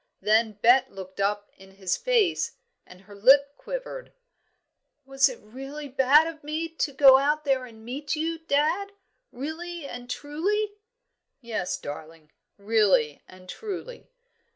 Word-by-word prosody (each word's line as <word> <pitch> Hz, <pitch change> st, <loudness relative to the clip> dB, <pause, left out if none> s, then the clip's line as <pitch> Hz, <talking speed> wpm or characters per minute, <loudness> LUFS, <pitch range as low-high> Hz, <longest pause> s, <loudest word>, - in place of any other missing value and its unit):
Then 220 Hz, +1 st, +2 dB
Bet 245 Hz, +5 st, +4 dB
looked 190 Hz, -1 st, -10 dB
up 205 Hz, +1 st, -1 dB
in 190 Hz, 0 st, -16 dB
his 190 Hz, -1 st, -1 dB
face, 465 Hz, -8 st, +1 dB, 0.3 s
and 180 Hz, 0 st, -15 dB
her 205 Hz, +1 st, -15 dB
lip 275 Hz, +7 st, +5 dB
quivered. -, -, -7 dB, 0.9 s
"Was 270 Hz, 0 st, +3 dB
it 250 Hz, -, -8 dB
really 270 Hz, +7 st, -9 dB
bad 270 Hz, +4 st, +5 dB
of 325 Hz, -2 st, -7 dB
me 310 Hz, +3 st, -3 dB
to 320 Hz, -2 st, -2 dB
go 270 Hz, -1 st, +7 dB
out 300 Hz, +2 st, 0 dB
and 250 Hz, -5 st, -2 dB
meet 285 Hz, +6 st, -3 dB
you, 325 Hz, +1 st, -2 dB
dad? 325 Hz, +6 st, 0 dB, 0.4 s
really 320 Hz, +4 st, -6 dB
and 245 Hz, -2 st, -8 dB
truly?" 355 Hz, +11 st, -2 dB, 0.7 s
"Yes, 220 Hz, -8 st, -3 dB
darling, 155 Hz, +1 st, -9 dB, 0.3 s
really 200 Hz, -8 st, +2 dB
and 185 Hz, 0 st, -16 dB
truly." 435 Hz, -, -7 dB
270 Hz, 130 wpm, -26 LUFS, 210-315 Hz, 0.9 s, go